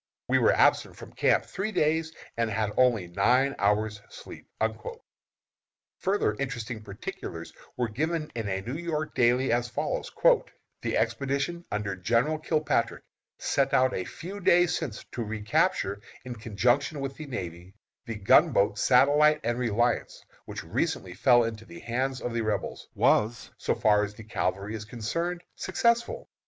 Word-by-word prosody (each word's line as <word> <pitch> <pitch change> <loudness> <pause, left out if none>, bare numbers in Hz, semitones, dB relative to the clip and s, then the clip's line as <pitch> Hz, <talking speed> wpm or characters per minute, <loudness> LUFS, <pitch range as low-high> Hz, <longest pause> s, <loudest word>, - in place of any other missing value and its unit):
We - - +3
were - - +4
absent - - +3
from - - -12
camp - - +2
three 195 +3 -3
days, 160 -3 +1 0.2
and 115 -1 0
had 110 -1 -1
only 120 -7 +3
nine 125 +10 +3
hours' 105 +1 +1
sleep." - - -11 1.5
Further 195 - +1
interesting 120 -5 -4
particulars 100 -1 -7 0.2
were 125 -1 +1
given 155 +7 -2
in 115 -4 -3
a 95 0 -2
New 125 - -5
York 155 -3 -3
daily, 125 +2 +3
as 120 +1 +1
follows: 120 - -3 0.7
"The - - -1
expedition 140 +5 -1
under 105 -2 -2
General 120 - +1
Kilpatrick, 155 0 0 0.3
sent 135 0 +1
out 130 -1 +3
a 95 - -2
few 185 - -8
days 175 -2 +4
since 135 -11 -4
to 120 - -3
recapture, 110 - 0 0.2
in 125 - -5
conjunction 120 +7 0
with 135 0 -4
the 155 - -7
navy, 90 -6 -6 0.3
the 115 - -4
gunboats 105 - +4
Satellite 145 +4 +5
and 120 +1 -1
Reliance, 120 0 0 0.2
which - - -6
recently 90 - -2
fell 120 +5 +5
into 110 -1 -4
the 170 +7 -11
hands 130 0 -2
of 120 - -3
the 115 - 0
Rebels, 110 -2 -3
was, 110 +2 +2
so - - 0
far 105 -1 +3
as 105 0 -5
the 110 - -10
cavalry 100 0 -2
is 110 -1 -5
concerned, 165 +11 -3
successful. 235 +5 0
120 Hz, 150 wpm, -28 LUFS, 105-150 Hz, 1.5 s, Satellite